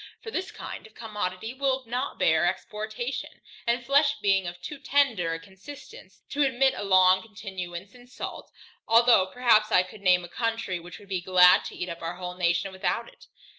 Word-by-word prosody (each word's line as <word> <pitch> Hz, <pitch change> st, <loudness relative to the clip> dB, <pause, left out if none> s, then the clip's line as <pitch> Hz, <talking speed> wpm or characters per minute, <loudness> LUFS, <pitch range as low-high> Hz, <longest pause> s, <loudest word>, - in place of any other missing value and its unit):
For 445 Hz, -, -7 dB
this 375 Hz, -3 st, -3 dB
kind -, -, -8 dB
of 220 Hz, -, -24 dB
commodity 210 Hz, -1 st, -4 dB
will 265 Hz, -1 st, -1 dB
not 250 Hz, +4 st, -3 dB
bear 160 Hz, +1 st, +3 dB
exportation, 215 Hz, +6 st, -4 dB, 0.4 s
and 235 Hz, +1 st, 0 dB
flesh 285 Hz, +2 st, +3 dB
being 195 Hz, -2 st, +2 dB
of 175 Hz, 0 st, -7 dB
too 290 Hz, +10 st, -8 dB
tender 245 Hz, -14 st, +1 dB
a -, -, -6 dB
consistence, 200 Hz, -, -13 dB
to 290 Hz, -, -1 dB
admit 270 Hz, -1 st, +3 dB
a -, -, -5 dB
long 185 Hz, -1 st, +5 dB
continuance 190 Hz, -3 st, -8 dB
in 245 Hz, 0 st, -16 dB
salt, 250 Hz, -, -8 dB, 0.4 s
although 230 Hz, -4 st, +5 dB
perhaps 215 Hz, 0 st, +3 dB
I 180 Hz, -, +5 dB
could 185 Hz, +3 st, -13 dB
name 180 Hz, -2 st, +4 dB
a -, -, -8 dB
country, 225 Hz, -3 st, -2 dB
which 170 Hz, -1 st, -11 dB
would 200 Hz, -, -17 dB
be 185 Hz, -2 st, -2 dB
glad 180 Hz, -1 st, +6 dB
to -, -, -7 dB
eat 180 Hz, -, -4 dB
up 170 Hz, -1 st, -7 dB
our 165 Hz, +1 st, -4 dB
whole 180 Hz, 0 st, -6 dB
nation 175 Hz, +1 st, 0 dB
without 190 Hz, -, -2 dB
it. -, -, -20 dB
205 Hz, 190 wpm, -26 LUFS, 180-245 Hz, 0.4 s, glad